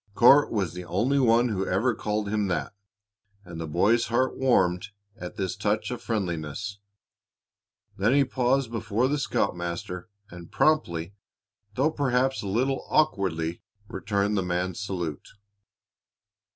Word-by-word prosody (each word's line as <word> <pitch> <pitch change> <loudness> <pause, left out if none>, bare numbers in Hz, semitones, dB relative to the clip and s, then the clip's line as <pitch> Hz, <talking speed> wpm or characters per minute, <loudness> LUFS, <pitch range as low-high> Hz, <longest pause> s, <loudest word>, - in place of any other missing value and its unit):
Court 140 +5 +6
was 95 -7 -1
the 90 0 -6
only 115 +11 +1
one 120 -1 +4
who 95 -3 -1
ever 105 +7 +1
called 105 -1 -2
him 105 0 0
that, 80 -4 -2 0.7
and 85 -1 -7
the 80 - -4
boy's 105 +9 +2
heart 130 +3 +1
warmed 95 -8 +2 0.3
at 90 -5 -8
this 95 -2 -2
touch 105 +3 -1
of 120 -1 -5
friendliness. 100 -2 -3 1.2
Then 110 +7 +3
he 140 -1 +4
paused 130 -1 0
before 115 +1 0
the 145 +2 0
scoutmaster 85 -5 -2 0.2
and 85 -1 -11
promptly, 95 - +1 0.6
though 140 +7 +2
perhaps 135 -2 +1
a 100 - -5
little 130 +7 0
awkwardly, 85 - +1 0.3
returned 100 +1 -1
the 95 - +1
man's 90 0 -2
salute. 90 -7 -5
105 Hz, 135 wpm, -26 LUFS, 90-125 Hz, 1.2 s, Court